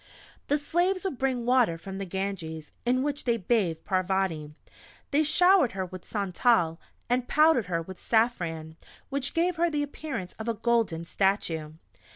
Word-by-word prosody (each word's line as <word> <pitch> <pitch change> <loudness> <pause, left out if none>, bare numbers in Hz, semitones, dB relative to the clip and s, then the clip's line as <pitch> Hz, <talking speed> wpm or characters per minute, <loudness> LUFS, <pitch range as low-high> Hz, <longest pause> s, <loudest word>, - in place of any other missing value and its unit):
The 290 - +3
slaves 350 +5 0
would 370 -10 -3
bring 255 -3 0
water 245 -9 +3
from 195 +3 -7
the 195 - -4
Ganges, 170 -5 -4 0.2
in 255 +1 +2
which 290 0 -3
they 235 -2 +2
bathed 185 -6 0
Parvati; 185 -5 0 0.6
they 295 +2 +4
showered 345 - +4
her 190 -1 -2
with 185 0 -10
"santal," 195 -4 +1 0.3
and 245 +1 0
powdered 305 - +4
her 165 -2 -1
with 185 +2 -10
safran, 170 -9 0 0.3
which 275 0 -2
gave 345 +1 +1
her 340 +1 +3
the 295 -2 0
appearance 275 - -5
of 220 - -5
a 230 - 0
golden 225 -7 0
statue. 165 -5 0
225 Hz, 160 wpm, -28 LUFS, 180-280 Hz, 0.6 s, they